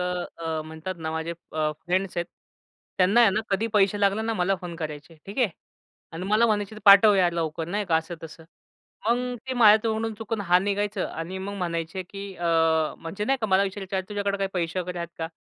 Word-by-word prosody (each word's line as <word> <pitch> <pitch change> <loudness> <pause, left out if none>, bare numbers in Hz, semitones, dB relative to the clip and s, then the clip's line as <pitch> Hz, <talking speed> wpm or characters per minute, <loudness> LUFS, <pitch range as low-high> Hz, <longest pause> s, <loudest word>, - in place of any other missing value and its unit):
अ, 175 -3 -3
म्हणतात 160 +4 -6
ना 160 -1 -4
माझे 160 +1 -3 0.2
अ, 155 -1 0
फ्रेंड्स 185 +1 -1
आहेत. 175 0 -1 0.7
त्यांना 195 +6 +5
आहे 230 - +7
ना 210 +3 0
कधी 200 +3 +1
पैसे 205 0 +3
लागले 200 +2 +2
ना 225 0 -1
मला 185 0 +1
फोन 175 -1 -6
करायचे, 155 0 -7
ठीक 200 +6 -7
आहे. 245 -5 +4 0.6
आणि 165 +3 -5
मला 215 +3 +4
म्हणायचे 210 -1 -1
पाठव 200 +1 +8
यार 180 -3 +3
लवकर 165 -1 -2
नाही 205 +3 -1
का 165 - +4
असं-तसं. 165 0 -6 0.6
मग 245 +1 0
ते 260 - -1
माझ्या 215 -4 +7
तोंडून 220 0 -1
चुकून 225 0 -4
हां 180 -1 +3
निघायचं 205 0 -1
आणि 170 +4 -5
मग 195 +2 -5
म्हणायचे 170 +1 -3
की 195 +1 -8
अ, 175 - -3 0.5
म्हणजे 190 +5 -5
नाही 270 +4 +1
का 220 - 0
मला 190 -1 +4
विचारायचं, 195 0 -3
"अरे 190 - -1
तुझ्याकडे 200 -1 -1
काही 195 -1 0
पैसे 175 0 -1
वगैरे 180 0 -5
आहेत 170 - -4
का? 160 0 -3
190 Hz, 200 wpm, -25 LUFS, 170-205 Hz, 0.7 s, पाठव